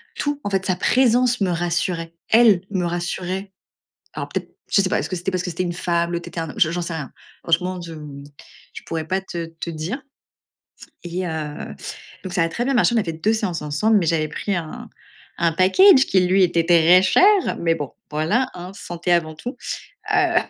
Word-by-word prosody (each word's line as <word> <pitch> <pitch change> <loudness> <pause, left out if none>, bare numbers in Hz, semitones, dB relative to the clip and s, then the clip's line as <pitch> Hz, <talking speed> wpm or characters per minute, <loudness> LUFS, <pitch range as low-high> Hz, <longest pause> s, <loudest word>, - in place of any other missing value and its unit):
tout, 290 0 -2
en 205 - -2
fait, 190 -1 +1
sa 185 - +1
présence 250 +2 +3
me 190 - +2
rassurait. 170 0 -1 0.2
Elle 220 -6 +6
me 185 -3 -1
rassurait. 180 +3 -3 0.6
Alors, - - -5
peut-être - - -4 0.2
je 200 - +5
sais 185 - 0
pas, - - +1
est-ce - - -4
que 185 - -2
c'était 180 +2 -2
parce 180 -1 -1
que 180 - -3
c'était 170 - -3
une 175 -1 -2
femme? 170 0 -1
L'autre 170 0 -4
était 170 - -6
un 165 -2 -3
hom - - -15
je 165 -4 +4
j'en 175 0 -2
sais 170 -1 -4
rien. 145 -4 -6 0.3
Franchement, 180 +2 0
je, 165 -1 -8
mmh, 145 -2 -9 0.5
je - - -9
pourrais 160 -1 -4
pas 190 +2 0
te 170 -3 -5
te 165 +1 -7
dire 170 - -4 1.0
et 180 +1 -3
heu, 155 -2 -5 0.5
donc 185 - -5
ça 170 - +2
a 165 - +1
très 240 - -2
bien 275 - +1
marché. 240 0 +3
On 225 - +4
a - - -3
fait 165 - -3
2 205 +8 +1
séances 185 -8 -2
ensemble, 150 +10 +2
mais 175 - 0
j'avais 155 -1 +1
pris 200 +6 -3
un 160 -2 -6 0.5
un 170 -1 +2
package 265 - +6
qui, 190 - +3
lui, 185 +2 +3
était 170 -1 +1
très 175 +1 +6
cher. 395 - +4
Mais 165 -1 +2
bon, 145 -4 -5 0.2
voilà, 195 +13 0
hein, 180 +1 -8
santé 175 -1 -3
avant 160 -2 +1
tout. 240 - -7 0.6
Heu - - +2
175 Hz, 215 wpm, -22 LUFS, 165-195 Hz, 1.0 s, Elle